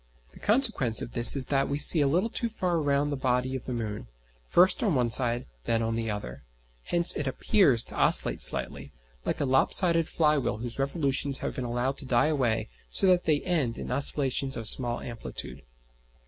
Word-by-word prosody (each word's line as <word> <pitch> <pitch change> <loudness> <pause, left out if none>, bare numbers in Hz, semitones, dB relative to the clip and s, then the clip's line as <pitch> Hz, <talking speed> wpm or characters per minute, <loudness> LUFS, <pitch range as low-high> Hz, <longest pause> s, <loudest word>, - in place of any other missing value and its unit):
The - - -17
consequence 210 - +2
of 115 - -9
this 120 +3 +7
is 135 -2 -2
that 135 0 0
we 140 - -2
see 155 +1 +7
a 140 - +1
little 180 +11 -1
too 235 - -3
far 180 -6 -3
round 145 0 -1
the - - -2
body 130 0 -2
of 130 - -8
the - - -7
moon, 110 - -6 0.4
first 185 - +2
on 205 - 0
one 120 -2 0
side, 120 0 +3 0.2
then 115 0 -1
on 115 0 -3
the 115 -1 -4
other. 70 - -7 0.4
Hence 170 -1 +4
it 145 - -4
appears 135 - +2
to - - -9
oscillate - - +2
slightly, - - -5 0.3
like - - -3
a - - -1
lop 130 0 +1
sided 165 -3 +4
fly 150 -2 +1
wheel 125 - -4
whose 120 +2 -7
revolutions 140 -1 -2
have - - -4
been 130 - -6
allowed 120 +3 -3
to 135 - -4
die 125 +4 +1
away 125 -7 -2 0.2
so - - -1
that 180 -1 +2
they 150 -3 0
end 155 -11 -2
in - - -7
oscillations 135 -2 -1
of 115 -2 -3
small 120 +1 +2
amplitude. 115 -2 -9
135 Hz, 205 wpm, -26 LUFS, 120-155 Hz, 0.4 s, this